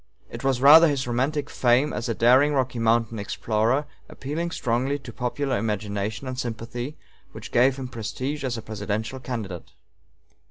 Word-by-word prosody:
It - - -7
was 135 -2 +1
rather 160 +4 +9
his 140 -3 -1
romantic 135 +5 -1
fame 125 +3 +2
as 120 - -3
a 115 - -1
daring 130 +6 +5
Rocky 130 -2 0
Mountain 115 -1 +1
explorer, 110 +6 0 0.2
appealing 155 +5 -4
strongly 130 -1 -1
to 130 -4 -11
popular 130 +2 -1
imagination 105 +2 -3
and 130 -1 -4
sympathy, 120 +3 -5 0.4
which - - -9
gave 130 +2 +4
him 135 -1 -6
prestige 130 +5 -4
as 125 -3 -2
a 115 - -7
presidential 110 +3 -4
candidate. 100 -11 -6
125 Hz, 155 wpm, -25 LUFS, 115-135 Hz, 0.4 s, rather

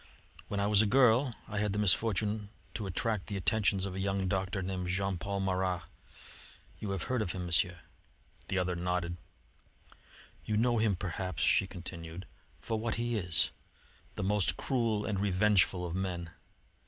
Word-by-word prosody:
When 100 - -2
I 100 - +2
was 105 0 +5
a 110 - +3
girl 125 +1 +4
I 105 -1 -3
had 105 -2 0
the - - -2
misfortune 105 +1 +2 0.2
to 105 -3 -4
attract 105 +2 -1
the 100 - -3
attentions 100 0 +2
of 95 - -4
a 95 - -4
young 95 0 0
doctor 95 +1 -1
named 90 -1 -3
Jean 95 0 -1
Paul 100 +2 -2
Marat. 95 -2 0 1.0
You 105 - -4
have 95 -3 -2
heard 130 -2 0
of 90 -5 -2
him, 90 -1 -4
Monsieur?" 90 +1 +2 0.7
The 95 - -1
other 90 -1 0
nodded. 85 0 -1 1.3
"You 105 - -1
know 120 +1 +3
him, 110 -3 +2
perhaps," 90 -2 -3
she 95 - +4
continued, 85 -1 -8 0.3
"for 110 -1 -2
what 110 0 -1
he 120 0 -1
is: 90 -8 +2 0.6
the - - -3
most 100 -1 +2
cruel 115 -6 0
and 100 -3 -1
revengeful 95 -2 +3
of 85 - -4
men. 90 -3 -3
95 Hz, 165 wpm, -32 LUFS, 90-105 Hz, 1.3 s, was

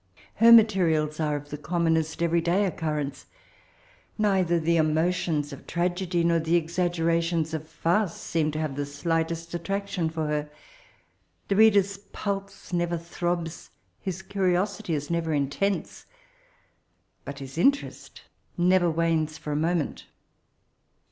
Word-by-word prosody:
Her 230 +2 +7
materials 170 -9 +5
are 150 -2 0
of 145 0 -7
the 150 - -5
commonest 160 0 0
every 170 0 +2
day 180 +5 +2
occurrence. 150 -6 -3 0.9
Kdther 190 -5 +2
the 165 +1 +1
emotions 155 -1 +1
of 140 - -12
tragedy, 175 0 0
nor 170 0 +3
the 165 +1 +1
exaggerations 170 -1 0
of 155 0 -5
farce, 175 +1 0
seem 160 -2 -1
to 155 - -3
have 155 -4 -2
the 145 0 -3
slightest 165 +3 -2
attraction 190 -1 -2
for 160 -1 -3
her. 150 0 -2 1.0
The 200 - +2
reader's 200 -2 +4
pulse 200 -2 -6
never 175 0 0
throbs, 170 0 -4 0.3
his 190 0 -5
cnrioeity 190 -1 0
is 145 +2 -4
never 165 -2 0
intense; 145 +8 -2 1.2
but 140 - -7
his 135 +3 -7
interest 280 +9 0 0.3
never 180 0 +4
wanes 160 -1 0
for 150 - -6
a - - -1
moment. 165 +1 -1
170 Hz, 130 wpm, -26 LUFS, 155-180 Hz, 1.2 s, Her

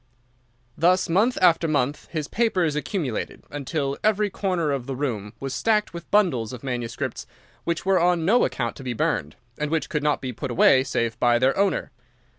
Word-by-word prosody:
Thus 180 +2 +3
month 210 +9 +2
after 170 -2 +5
month 145 -2 -1
his 155 -3 -3
papers 185 -9 +1
accumulated, 150 - -3
until 140 -1 -3
every 210 -1 +2
corner 180 -7 -1
of 135 -3 -3
the 135 - -3
room 115 -7 -3
was 135 -1 -4
stacked 210 -4 +1
with 170 0 -9
bundles 135 - +2
of 125 - -9
manuscript 120 -3 -4 0.4
which 170 +1 -2
were 190 -1 +3
on 175 -1 +2
no 235 +7 +4
account 120 -2 -1
to 135 - -9
be 125 -2 -3
burned, 75 -8 -1 0.2
and 150 0 -1
which 160 0 -1
could 150 -5 -1
not 150 -1 +1
be 130 -2 -5
put 120 - -5
away 130 +2 +5
save 115 -3 -2
by 120 -1 +4
their 130 +2 +2
owner. 200 0 0
150 Hz, 185 wpm, -24 LUFS, 130-180 Hz, 0.4 s, after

